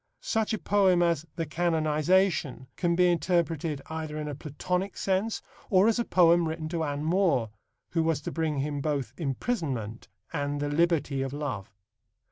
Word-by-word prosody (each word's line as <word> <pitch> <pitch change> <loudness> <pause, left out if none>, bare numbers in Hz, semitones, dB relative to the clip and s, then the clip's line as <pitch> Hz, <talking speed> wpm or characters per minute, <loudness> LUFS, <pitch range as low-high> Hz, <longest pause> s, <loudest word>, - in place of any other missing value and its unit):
Such 220 -1 0
a 220 - 0
poem 190 -5 +3
as 165 -2 +1
The 165 - -2
Canonisation 160 -2 +1
can 170 -1 +1
be 180 +1 +4
interpreted 165 -4 0
either 160 -1 -5
in 150 -1 -3
a 145 - -4
Platonic 180 +7 -3
sense 195 +3 0 0.3
or 190 +1 +5
as 230 +1 +2
a - - +2
poem 170 -4 +4
written 160 0 -4
to 165 -1 -1
Anne 145 -1 -2
More, 160 - +2 0.4
who 165 - +1
was 160 -2 +1
to - - -5
bring 160 -3 -1
him 145 0 -2
both 140 -5 -2
imprisonment 135 - -3 0.3
and 145 -1 -1
the 145 0 -1
liberty 150 -3 +1
of 135 0 -3
love. 140 -10 -4
160 Hz, 165 wpm, -28 LUFS, 145-175 Hz, 0.4 s, or